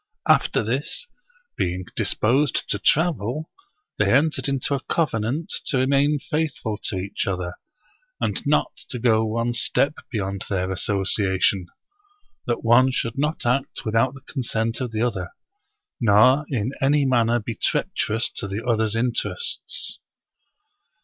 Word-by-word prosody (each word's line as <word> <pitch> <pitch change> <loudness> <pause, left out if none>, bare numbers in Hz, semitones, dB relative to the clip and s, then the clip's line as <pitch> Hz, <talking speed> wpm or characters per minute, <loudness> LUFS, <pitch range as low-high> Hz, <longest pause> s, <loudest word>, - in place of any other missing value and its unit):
After - - +3
this, 135 - -2 0.5
being 90 +1 -2
disposed 130 +5 +1
to 100 - 0
travel, 155 - +1 0.5
they - - +3
entered 150 +4 +2
into 135 0 0
a 140 - +1
covenant 140 0 0
to 135 - +1
remain 140 +3 +3
faithful 150 -7 -2
to 95 - 0
each 100 +2 -3
other, 90 -2 -2 0.7
and - - -1
not - - +2 0.2
to 125 - -3
go 115 -2 +3
one 115 +2 -1
step 135 +5 +2 0.2
beyond 100 -4 -3
their 95 -1 -1
association 95 -1 +1 0.4
— 405 0 -41
^that 120 - -1
one 125 +3 +5
should 115 0 -2
not 150 0 -1
act 125 +3 0
without 115 +4 +2
the 135 - -12
consent 115 -4 -2
of 125 - -2
the 110 0 -1
other, 95 -7 -2 0.7
nor 120 +6 +5
in 125 -2 -1
any 140 +1 +3
manner 120 -2 +3
be 115 +1 -5
treacherous 110 +1 -1
to - - -2
the 100 +3 -4
other's 110 -2 +1
interests. 125 - -2
120 Hz, 135 wpm, -23 LUFS, 105-140 Hz, 0.7 s, one